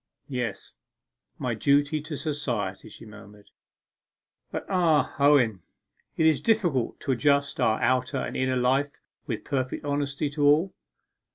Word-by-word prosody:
'Yes 125 -4 -4 0.6
my - - -2
duty 145 +2 +2
to 155 0 -6
society,' 120 - -3
she - - -13
murmured. 105 -1 -15 1.0
'But - - -5
ah, 170 -6 +2
Owen, 130 -9 +4 0.6
it 160 - +2
is 155 -4 +3
difficult 175 - +1
to 135 - -1
adjust 140 +2 +1
our 110 0 +2
outer 130 +2 +1
and - - -4
inner 130 0 0
life 135 +3 0 0.3
with 115 -4 -4
perfect 130 -1 -3
honesty 145 0 -1
to 145 0 -2
all! 155 +6 +4
140 Hz, 130 wpm, -26 LUFS, 125-150 Hz, 1.0 s, Owen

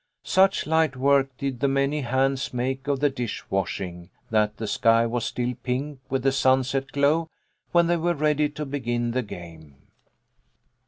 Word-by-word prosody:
Such 190 +1 +3
light 160 -3 +2
work 135 +1 +3
did 135 -3 -3
the 140 - +2
many 140 +2 +1
hands 130 +1 0
make 130 +2 -2
of 140 -1 0
the 145 - +4
dish 120 -4 -4
washing, 90 -1 -3 0.2
that 105 -1 +1
the 110 - -4
sky 115 +2 +3
was 115 0 -2
still 125 0 -2
pink 135 +3 -3
with 135 -1 -1
the 135 - +3
sunset 135 0 +1
glow 150 +4 +2 0.4
when 170 0 +4
they 170 +1 +2
were 170 +1 0
ready 150 0 +1
to 150 +1 -6
begin 120 -4 -2
the 130 +2 0
game. 80 - -10
135 Hz, 165 wpm, -25 LUFS, 120-145 Hz, 0.4 s, the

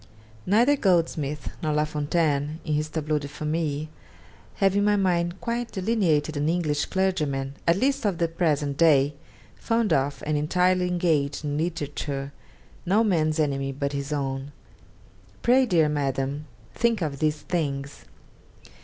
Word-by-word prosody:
Neither 235 +9 +4
Goldsmith, 160 - 0
nor 155 -2 0
La 150 0 +2
Fontaine 150 0 0
in 155 - -1
his 150 +1 0
"Tableau 155 -1 -1
de 145 - -6
Famille," 150 0 -2 0.7
have 195 -1 +2
in 205 - +3
my 210 0 +3
mind 175 -2 0
quite 235 0 -3
delineated 180 -7 +1
an 145 +2 0
English 155 -4 0
clergyman, 150 -8 -1
at 170 +2 +4
least 270 +5 +1
of 200 -5 0
the 170 - +1
present 150 -4 0
day, 145 -3 +4 0.4
fond 230 -2 0
of 135 0 0
and 150 0 0
entirely 180 +4 +2
engaged 160 -5 0
in 145 -1 -2
literature, 145 -3 -3 0.5
no 200 +5 +3
man's 160 -6 +1
enemy 135 -2 0
but 140 +1 -3
his 140 +1 -4
own. 135 -1 -3 0.9
Pray, 255 +1 +4
dear 165 -6 +3
Madam, 140 0 -2 0.3
think 230 -5 +1
of 140 -3 -3
these 155 -1 0
things. 140 -4 -3
155 Hz, 145 wpm, -25 LUFS, 145-180 Hz, 0.9 s, Neither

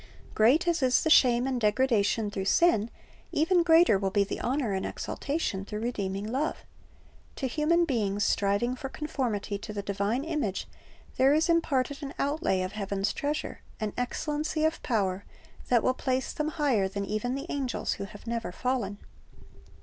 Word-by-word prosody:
"'^ - - -16
Great 260 +11 +4
as 340 -3 +1
is 255 -1 +3
the 315 - +1
shame 245 -4 +5
and 260 -2 -1
degradation 215 -1 +2
through 195 -2 -3
sin, 225 - +3 0.4
even 345 +3 +3
greater 325 - +5
will 195 -1 0
be 200 +1 +2
the 200 - -5
honor 255 -4 -1
and 190 - -1
exaltation 280 -10 -3
through 210 +1 -5
redeeming 200 -4 -2
love. 265 +8 -2 0.7
To - - -3
human 315 +6 +2
beings 205 -8 0
striving 205 +5 +1
for 270 +1 -6
conformity 245 -10 -3
to 210 - -7
the 205 -1 -4
divine 200 +6 -1
image 295 - -2 0.5
there 270 +3 +5
is 320 +3 +2
imparted 285 -4 +1
an 280 -1 -6
outlay 280 - 0
of 185 - -4
heaven's 200 -1 -2
treasure, 295 +1 -3 0.2
an 215 -1 -2
excellency 300 +5 -1
of 315 +1 0
power, 200 -4 0 0.5
that 240 -3 +4
will 255 - +3
place 260 0 -2
them 305 - -2
higher 280 -11 +1
than 200 +1 -4
even 215 +5 -2
the 275 +2 -5
angels 270 -4 -2
who 200 - -5
have 205 +1 -13
never 230 -4 -3
fallen. 230 -2 -2
245 Hz, 170 wpm, -28 LUFS, 205-295 Hz, 0.7 s, shame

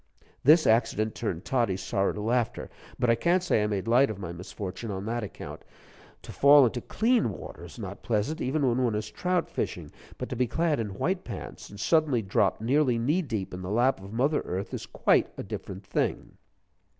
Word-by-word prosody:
This 155 +3 +6
accident 110 -1 +2
turned 95 -4 -4
Toddie's 115 -9 0
sorrow 100 0 +1
to 105 - -5
laughter, 120 +2 -1 0.3
but 120 -1 +3
I - - +6
can't 175 +10 +2
say 175 -11 +2
I 105 - +1
made 100 -2 -2
light 125 +4 +5
of 110 - -4
my 90 -4 -6
misfortune 95 +4 -6
on 95 0 -4
that 120 +2 -2
account. 105 - -8 0.6
To - - -9
fall 140 0 +7
into 120 +1 -1
clean 230 - +1
water 95 - -8
is - - -12
not - - -7
pleasant, 115 +9 -1
even 140 +2 +1
when 125 +1 +2
one 115 -3 +1
is 105 0 -3
trout 180 -1 0
fishing; - - -4 0.3
but - - -4
to - - -3
be 125 +1 +1
clad 155 +4 +1
in 105 -4 -3
white 185 +1 -1
pants, - - -8
and 100 - -11
suddenly 150 -3 +2
drop 95 0 +1
nearly 125 +2 +2
knee 145 +11 +1
deep 110 - -4
in 90 - -6
the 90 - -5
lap 120 +1 +2
of 95 +1 -10
mother 135 +7 +1
Earth 95 +2 -4
is - - -5
quite - - +2
a - - -4
different 95 0 -7
thing. - - -2
115 Hz, 205 wpm, -28 LUFS, 100-140 Hz, 0.6 s, fall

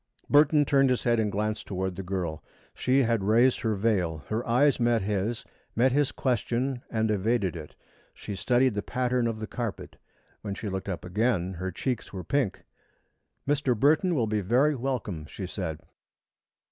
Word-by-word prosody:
Burton 145 0 +5
turned 135 -1 +4
his 125 - 0
head 120 -1 +2
and 105 -2 0
glanced 105 +2 -2
toward 95 -1 -3
the 95 - -5
girl. 90 -4 -4 0.3
She 135 +2 +2
had 115 -3 +1
raised 115 +5 +4
her 110 -2 0
veil. 95 -7 0
Her 110 +2 -1
eyes 135 +5 +3
met 120 -3 +2
his, 105 +3 -2 0.3
met 125 +3 +3
his 145 +1 +2
question 125 0 -1
and 110 -1 0
evaded 105 -2 0
it. 75 -2 -9 0.4
She 100 - -7
studied 125 +4 +2
the 105 - -2
pattern 125 0 0
of 115 -1 -2
the 110 - -3
carpet. 115 -2 -5 0.4
When 100 -2 -4
she 105 0 -5
looked 95 +1 -4
up 90 - -4
again, 95 -1 0
her 95 +1 -4
cheeks 125 +5 -3
were 95 -2 -6
pink. 135 -5 -1 0.8
"Mr. 140 -5 +1
Burton 160 - +3
will 120 -6 +2
be 105 -1 -1
very 125 +10 +3
welcome," 120 - -3
she 95 - -6
said. 90 -4 -4
115 Hz, 170 wpm, -27 LUFS, 95-125 Hz, 0.8 s, Burton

